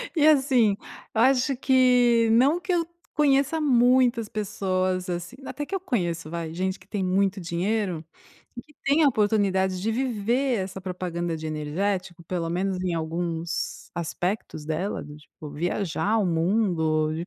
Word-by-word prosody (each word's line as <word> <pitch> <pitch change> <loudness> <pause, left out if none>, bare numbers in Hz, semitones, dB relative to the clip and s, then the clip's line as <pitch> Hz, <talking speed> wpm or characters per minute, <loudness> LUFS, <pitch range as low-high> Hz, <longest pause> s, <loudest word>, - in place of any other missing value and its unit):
E 305 -2 +4
assim, 260 -8 +4 0.4
eu 220 - +3
acho 265 +1 +3
que, 250 -3 +4
não 270 +9 +4
que 355 +1 -4
eu 340 -1 +2 0.3
conheça 285 +1 +3
muitas 250 -4 +3
pessoas, 185 -3 -1
assim 175 +6 -4
até 290 - -5
que 380 - -10
eu 390 - 0
conheço, 175 - -2
vai, 165 -1 -4
gente 185 +2 -2
que - - -20
tem 205 -3 -2
muito 195 +2 +1
dinheiro, 180 0 -1 0.5
e 240 - -6
que 300 - -24
tem 285 +4 +3
a 295 - +6
oportunidade 200 -5 +1
de 225 +2 0
viver 245 +1 0
essa 190 0 -5
propaganda 175 -2 -3
de 160 0 -6
energético, 175 +4 -2
pelo 170 -1 -3
menos 185 +2 -1
em 180 -2 -1
alguns 165 +1 -3
aspectos 175 -1 -3
dela, 160 +6 -2
do 145 0 -10
tipo, 150 0 -12
viajar 180 +6 -1
o 215 - +2
mundo 165 -3 +1
de 165 +2 -4
195 Hz, 155 wpm, -25 LUFS, 170-245 Hz, 0.5 s, a